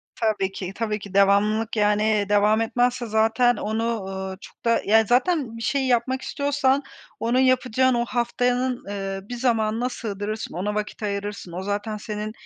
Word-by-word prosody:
Tabii 210 -4 0
ki, 190 -1 -5
tabii 215 -2 -2
ki. 200 -1 -10
Devamlılık, 210 +3 +3
yani, 210 0 +2
devam 210 +2 +4
etmezse 245 +2 +1
zaten 225 +2 +3
onu, 220 +2 -2 0.2
ııı, 190 0 -5
çok - - -15
da, 230 0 +3
yani, 220 0 +4
zaten 250 -2 +1
bir - - -8
şey 270 +1 0
yapmak 255 +2 +1
istiyorsan 280 -1 +1 0.4
onu 240 +2 +1
yapacağın 255 0 +3
o 240 0 +1
haftanın, 245 +1 0
ııı, 195 -1 -5
bir 245 - -4
zamanına 235 -1 +1
sığdırırsın, 215 -2 -5
ona 200 +5 -2
vakit 210 +1 -4
ayırırsın. 200 -2 -4
O 180 +2 -5
zaten 205 +2 -3
senin 210 0 -5
220 Hz, 160 wpm, -24 LUFS, 205-245 Hz, 0.4 s, devam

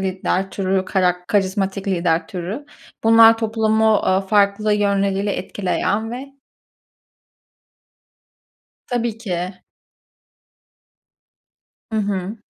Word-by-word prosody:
lider 190 0 -1
türü, 190 -1 -1
karak 180 -2 0
karizmatik 195 -2 -1
lider 170 -3 0
türü. 190 +10 -6 0.4
Bunlar 225 0 +7
toplumu, 220 0 +2
aaa, 190 -2 +2
farklı 200 +1 +2
yönleriyle 200 -1 +1
etkileyen 205 +3 -2
ve 265 +3 -7 2.6
Tabii 235 -2 -2
ki. 185 -4 -4 2.3
Hı - - -1
hı. 200 -1 -2
200 Hz, 80 wpm, -20 LUFS, 190-220 Hz, 2.6 s, Bunlar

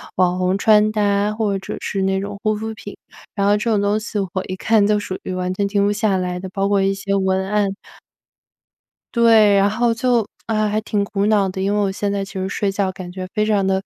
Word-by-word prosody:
网 180 0 +2
红 185 +1 +1
穿 215 0 +4
搭， 205 0 +1
或 210 -3 -1
者 - - -6
是 195 - -2
那 190 0 0
种 200 0 -6
护 215 0 +1
肤 220 +1 -5
品。 205 -1 -10 0.4
然 200 -2 0
后 205 +1 +4
这 220 +3 -2
种 210 -3 +2
东 205 +1 +1
西 215 -1 -5
我 190 -1 -2
一 185 - -4
看 210 +1 +2
就 210 - +3
属 190 -2 -4
于 185 - -4
完 185 0 -2
全 200 +1 -1
停 200 0 +1
不 205 - +2
下 205 -1 +1
来 180 -1 -2
的， 190 - -6
包 195 0 0
括 200 -1 +2
一 195 0 +2
些 200 0 -3
文 190 -1 +1
案。 205 -2 0 1.4
对， 225 -3 +5
然 200 0 +4
后 230 +2 +1
就 235 -2 +1 0.2
唉， 215 -1 +1
还 215 +1 0
挺 205 -2 -1
苦 200 0 -1
恼 210 -2 +3
的， 190 +1 -5
因 200 +2 0
为 210 - +1
我 200 -1 +1
现 200 +1 -2
在 200 -1 -1
其 195 - -13
实 190 0 -3
睡 200 0 -1
觉 195 -1 -1
感 185 -1 -9
觉 185 0 -6
非 215 -1 +1
常 205 -3 +1
的 190 0 +1
200 Hz, 265 characters per minute, -20 LUFS, 190-210 Hz, 1.4 s, 对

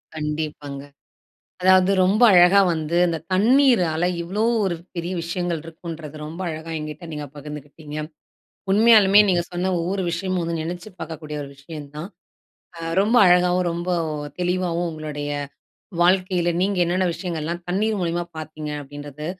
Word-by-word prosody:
கண்டிப்பாங்க. 150 -2 -4 0.8
அதாவது 185 +1 +5
ரொம்ப 205 +6 +2
அழகா 180 +3 +7
வந்து, 160 +2 -2
இந்த 165 -1 -1
தண்ணீரால, 205 - +4 0.2
இவ்ளோ 190 +5 -2 0.2
ஒரு 180 -3 -1 0.2
பெரிய 170 +2 -3
விஷயங்கள் 170 -1 -2
இருக்குன்றது, 160 -2 -8
ரொம்ப 165 +4 -8
அழகா 160 +1 -6
என்கிட்டே 155 +3 -7
நீங்க 150 -1 -5
பகிர்ந்துக்கிட்டீங்க. 150 +1 -9 0.8
உண்மையாலுமே 210 -2 +6
நீங்க 175 -2 +3
சொன்ன 180 +1 -1
ஒவ்வொரு 185 +3 -1
விஷயமும் 185 +1 -1
வந்து, 165 -1 -2
நெனைச்சு 175 +5 -6
பாக்கக்கூடிய 155 -2 -6
ஒரு 140 - -9
விஷயம் 145 0 -9
தான். 170 +6 -6 0.7
அ - - -8 0.2
ரொம்ப 220 +4 +2
அழகாகவும், 180 0 +4
ரொம்ப 170 +1 -5 0.5
தெளிவாவும், 175 -1 0
உங்களுடைய 150 -2 -5 0.7
வாழ்க்கையில, 180 -1 +2
நீங்க 200 0 0
என்னன்ன 185 +1 +1
விஷயங்கள்லாம், 170 -1 -4
தண்ணீர் 210 +3 0
மூலியமா 175 0 -1
பார்த்தீங்க. 155 -1 -6
அப்படின்றது, 145 +1 -8
170 Hz, 130 wpm, -22 LUFS, 155-185 Hz, 0.8 s, அழகா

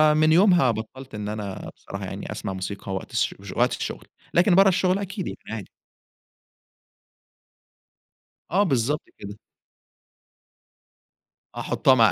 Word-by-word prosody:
من 155 0 +4
يومها 175 - +5
بطَّلت 120 +4 -7
إن 105 0 -4
أنا 105 -3 -5
بصراحة - - -7
يعني - - -6
أسمَع 95 - -4
موسيقى 95 +1 -5
وقت 95 - -5
الش - - 0 0.2
وقت - - +3
الشغل، - - -5 0.3
لكن 180 +1 +5
برَّه 195 +1 +7
الشغل 185 +1 +2
أكيد 195 0 -4
يعني - - -5
عادي. 110 -4 -5 2.8
آه 195 +4 +4
بالضبط 140 - +1 0.2
كده. 100 +1 -8 2.2
احطها 130 - +3
مع 115 -3 +6
130 Hz, 120 wpm, -25 LUFS, -, 2.8 s, برَّه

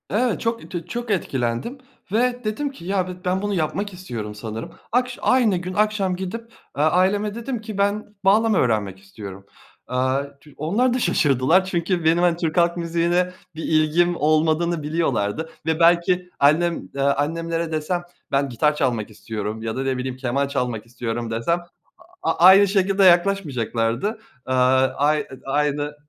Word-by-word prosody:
Evet, 235 +2 0
çok 230 0 -3
tü 175 -3 -5
çok 240 -1 -4
etkilendim 130 - -2 0.3
ve 245 +3 +1
dedim 250 +7 -2
ki 220 -11 -13
ya 190 -1 0
bi - - -5
ben 185 +1 0
bunu 205 0 -1
yapmak 195 +4 -2
istiyorum 115 - -6
sanırım. 110 +1 -6 0.2
Akş 250 +1 0
aynı 235 -7 +3
gün 180 +1 -5
akşam 205 -2 +1
gidip, 190 +5 -5 0.4
eee, 145 - +2
aileme 195 +6 +2
dedim 235 0 -4
ki 215 -2 -7
ben 205 +1 -1
bağlama 215 +1 +4
öğrenmek 105 - 0
istiyorum. 100 0 -10 0.4
Aaa 135 +2 -1
tü 150 - -17
onlar 210 - +1
da 255 - 0
şaşırdılar. 160 - +3
Çünkü 175 -1 -1
benim 160 +1 +4
hani 175 -1 +3
Türk 165 -2 -2
halk 170 0 +3
müziğine 170 +2 0 0.2
bir 160 - -6
ilgim 160 +3 +2
olmadığını 155 +1 +1
biliyorlardı 155 -3 -1 0.2
ve 160 0 0
belki 175 +2 +3
annem, 165 +4 +2
eee, 140 - -2
annemlere 165 +4 0
desem 160 +3 -2 0.3
ben 140 0 +1
gitar 150 +5 +1
çalmak 120 -7 -1
istiyorum 110 0 -5
ya 110 0 -3
da 130 - -2
ne 135 -1 -1
bileyim 125 0 -4
keman 135 +2 -1
çalmak 125 -5 -2
istiyorum 115 0 -4
desem 115 +10 0 0.6
a - - +2
aynı 190 +3 +7
şekilde 195 0 +2
yaklaşmayacaklardı. 175 - +2 0.3
Aaa 130 0 +3
ay 150 +1 +1 0.2
aynı 145 +1 -1
165 Hz, 155 wpm, -22 LUFS, 130-195 Hz, 0.6 s, aynı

